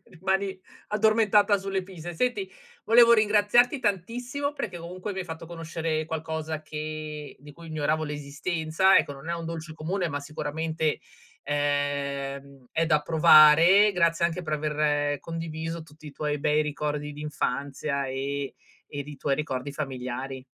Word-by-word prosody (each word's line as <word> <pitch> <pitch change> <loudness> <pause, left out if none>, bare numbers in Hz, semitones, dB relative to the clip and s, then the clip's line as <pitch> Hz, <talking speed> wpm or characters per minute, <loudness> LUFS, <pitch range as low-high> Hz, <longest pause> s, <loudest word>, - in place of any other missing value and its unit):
rimani 190 +2 -2 0.3
addormentata 215 -1 +4
sulle 195 -1 -2
pise". 175 -2 -8
Senti, 250 - -1 0.3
volevo 235 0 +7
ringraziarti 215 +4 +4
tantissimo 245 - -2
perché 200 -10 -5
comunque 180 +4 -6
mi 190 - -4
hai - - -4
fatto 165 -1 -7
conoscere 165 -1 -3
qualcosa 160 -1 -4
che 155 -1 -6
di 145 +1 -13
cui 165 +2 -12
ignoravo 155 0 0
l'esistenza. 155 +5 +1
Ecco, - - -1
non 140 +5 -8
è - - 0
un 165 -1 -5
dolce 165 -1 -6
comune, 175 +4 -2
ma 145 -1 -3
sicuramente, 155 +2 -2 0.5
ehm, 140 -2 -2
è 165 - +2
da 155 -2 +3
provare. 160 +6 +7
Grazie 170 -2 +2
anche 170 +1 -4
per 155 -2 -4
aver 150 -1 0
condiviso 165 0 -5
tutti 155 0 -16
i - - -11
tuoi 150 +1 -2
bei 150 +1 +2
ricordi 150 0 -3
d'infanzia 140 -1 -2
e 140 +1 -3 0.4
ed 145 -1 -5
i 145 -1 -9
tuoi 135 +1 0
ricordi 140 -2 -3
familiari. 130 -2 -5
155 Hz, 145 wpm, -27 LUFS, 145-180 Hz, 0.5 s, volevo